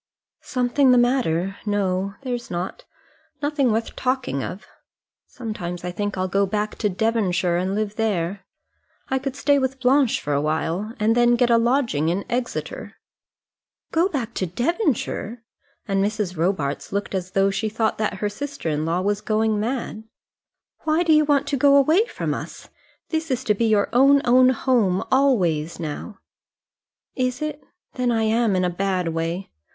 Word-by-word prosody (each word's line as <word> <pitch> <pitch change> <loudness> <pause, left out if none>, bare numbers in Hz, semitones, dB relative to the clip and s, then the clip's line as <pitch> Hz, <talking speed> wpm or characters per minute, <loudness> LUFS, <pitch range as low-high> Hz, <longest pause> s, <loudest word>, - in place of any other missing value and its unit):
"Something 255 +2 +1
the 250 - +6
matter! 200 -7 +1
No, 195 -2 -1
there's 245 -2 -4
not; 175 +1 -5 0.5
nothing 285 -4 +1
worth 225 +1 -2
talking 255 - -1
of. 190 - -6 0.6
Sometimes 180 -8 -6
I 180 - -3
think 205 +1 -3
I'll 185 0 0
go 195 +2 +1
back 210 +1 -2
to 210 - +1
Devonshire 190 -4 +1
and 185 +2 -1
live 215 0 -2
there. 195 -4 -1 0.7
I 265 - +1
could 270 0 -4
stay 285 0 +3
with 265 0 -2
Blanche 260 0 +3
for 145 -1 -2
a 140 - +1
time, 165 +8 -2
and 220 +2 +2
then 240 0 +4
get 240 0 +2
a 230 - +5
lodging 235 - +1
in 185 +4 -1
Exeter." 245 0 -4 1.0
"Go 340 +4 +2
back 240 - -3
to 185 - -2
Devonshire!" 245 - -1 0.4
and 195 -1 +1
Mrs. 205 -3 -2
Robarts 160 -4 -1
looked 200 +1 -3
as 185 -1 -2
though 195 0 +3
she 215 +3 -1
thought 220 0 -1
that 215 -3 0
her 210 +2 -2
sister 280 - -5
in 150 0 -1
law 170 +3 0
was 205 +2 0
going 220 0 +1
mad. 225 -1 -3 0.7
"Why 315 +2 +1
do 325 -2 +4
you 305 0 +5
want 285 -1 +2
to 285 - 0
go 280 +1 +5
away 315 - +4
from - - -3
us? - - -8 0.4
This 320 0 -2
is 260 -1 -1
to 215 - +2
be 230 +3 0
your 215 -2 +3
own, 275 +3 +5
own 255 +1 +6
home, 230 -7 +1
always 180 - +2
now." 165 +6 -6 1.0
"Is 255 0 -1
it? 300 -1 -4 0.3
Then 250 -1 0
I 225 -1 +1
am 220 -1 +2
in 185 0 +1
a - - +1
bad 185 -1 -1
way. 165 +3 -3
220 Hz, 170 wpm, -23 LUFS, 185-255 Hz, 1.0 s, the